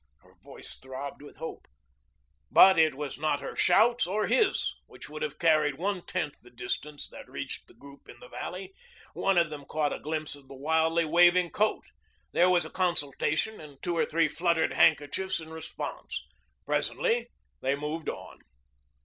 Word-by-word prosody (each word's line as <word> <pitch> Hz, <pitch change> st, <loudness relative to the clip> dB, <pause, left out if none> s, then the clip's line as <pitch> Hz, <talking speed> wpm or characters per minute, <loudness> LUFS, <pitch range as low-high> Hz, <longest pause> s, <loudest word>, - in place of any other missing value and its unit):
Her -, -, -22 dB
voice -, -, -12 dB
throbbed 130 Hz, +2 st, -7 dB
with 145 Hz, -, -12 dB
hope. 160 Hz, -, -7 dB, 0.8 s
But 190 Hz, -3 st, +8 dB
it 160 Hz, -3 st, +4 dB
was 140 Hz, -2 st, -5 dB
not 150 Hz, -2 st, +1 dB
her -, -, -6 dB
shouts 225 Hz, +4 st, +4 dB
or 210 Hz, +3 st, 0 dB
his, 430 Hz, -5 st, +2 dB
which -, -, -11 dB
would -, -, -7 dB
not 475 Hz, -, 0 dB
have -, -, -31 dB
carried 155 Hz, -5 st, +3 dB
one 185 Hz, +1 st, -2 dB
tenth 145 Hz, -2 st, -3 dB
the 120 Hz, -, -16 dB
distance, 125 Hz, +5 st, -5 dB
that -, -, -12 dB
reached -, -, -6 dB
the -, -, -18 dB
group 140 Hz, 0 st, -15 dB
in -, -, -12 dB
the -, -, -12 dB
valley. 390 Hz, -5 st, -6 dB, 0.4 s
One 195 Hz, -2 st, +1 dB
of 170 Hz, -3 st, +3 dB
them 145 Hz, -2 st, -7 dB
caught 150 Hz, +1 st, -1 dB
a -, -, -5 dB
glimpse 155 Hz, 0 st, -3 dB
of 140 Hz, -2 st, -13 dB
the 135 Hz, -, -11 dB
wildly 160 Hz, +4 st, +2 dB
waving 175 Hz, +2 st, +5 dB
coat. 215 Hz, +1 st, +1 dB, 0.5 s
There 180 Hz, +1 st, +4 dB
was 175 Hz, -3 st, +3 dB
a 160 Hz, -, -9 dB
consultation 170 Hz, +3 st, 0 dB
and 145 Hz, -3 st, -12 dB
two 175 Hz, -1 st, -1 dB
or 165 Hz, -, +2 dB
three 165 Hz, 0 st, +2 dB
fluttered 170 Hz, +1 st, +1 dB
handkerchiefs 165 Hz, +5 st, +2 dB
in 160 Hz, -1 st, -9 dB
response. 160 Hz, -1 st, -6 dB, 0.4 s
Presently 235 Hz, +1 st, 0 dB, 0.3 s
they 135 Hz, +1 st, +1 dB
moved 150 Hz, +3 st, -4 dB
on. -, -, -8 dB
160 Hz, 175 wpm, -29 LUFS, 145-180 Hz, 0.8 s, But